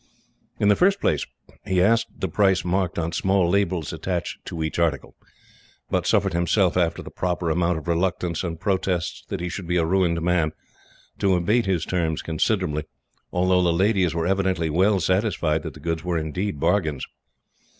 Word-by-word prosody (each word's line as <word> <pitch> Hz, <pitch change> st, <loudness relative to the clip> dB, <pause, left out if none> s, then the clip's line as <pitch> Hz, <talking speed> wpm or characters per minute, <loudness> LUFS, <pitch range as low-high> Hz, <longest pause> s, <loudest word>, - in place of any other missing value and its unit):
In 105 Hz, -, +2 dB
the 105 Hz, -, +6 dB
first 195 Hz, -, +3 dB
place, 75 Hz, -, 0 dB, 0.4 s
he 95 Hz, -1 st, 0 dB
asked 115 Hz, +5 st, +3 dB
the 95 Hz, -, -2 dB
prices 95 Hz, +1 st, +2 dB
marked 90 Hz, 0 st, 0 dB
on 85 Hz, 0 st, -1 dB
small 95 Hz, +1 st, +2 dB
labels 90 Hz, -3 st, 0 dB
attached 90 Hz, -2 st, -4 dB
to 80 Hz, -1 st, -4 dB
each 80 Hz, -, -3 dB
article, 80 Hz, -5 st, 0 dB, 0.8 s
but -, -, 0 dB
suffered -, -, +2 dB
himself, 85 Hz, +2 st, +2 dB
after 85 Hz, -2 st, 0 dB
the -, -, -10 dB
proper 90 Hz, -2 st, -1 dB
amount 85 Hz, +1 st, +1 dB
of 80 Hz, -, -8 dB
reluctance, 85 Hz, 0 st, 0 dB
and 85 Hz, -3 st, -4 dB
protests 90 Hz, -2 st, -1 dB
that 100 Hz, -3 st, -4 dB
he 90 Hz, -, -2 dB
should 90 Hz, 0 st, -6 dB
be 90 Hz, +1 st, +1 dB
a 85 Hz, -, +2 dB
ruined 85 Hz, -1 st, +2 dB
man, 85 Hz, -3 st, +1 dB, 0.7 s
to 95 Hz, -2 st, +3 dB
abate 105 Hz, +6 st, +1 dB
his 90 Hz, -4 st, 0 dB
terms 80 Hz, -4 st, -1 dB
considerably, 80 Hz, -2 st, -1 dB, 0.5 s
although 90 Hz, +1 st, +2 dB
the 90 Hz, -1 st, +3 dB
ladies 95 Hz, -1 st, +2 dB
were 85 Hz, -1 st, 0 dB
evidently 95 Hz, -3 st, 0 dB
well 95 Hz, +5 st, +3 dB
satisfied 90 Hz, -4 st, +1 dB
that -, -, -7 dB
the -, -, -11 dB
goods 80 Hz, -1 st, -3 dB
were 90 Hz, -1 st, -1 dB
indeed 80 Hz, +2 st, -3 dB
bargains. 80 Hz, -4 st, 0 dB
90 Hz, 175 wpm, -24 LUFS, 85-95 Hz, 0.8 s, the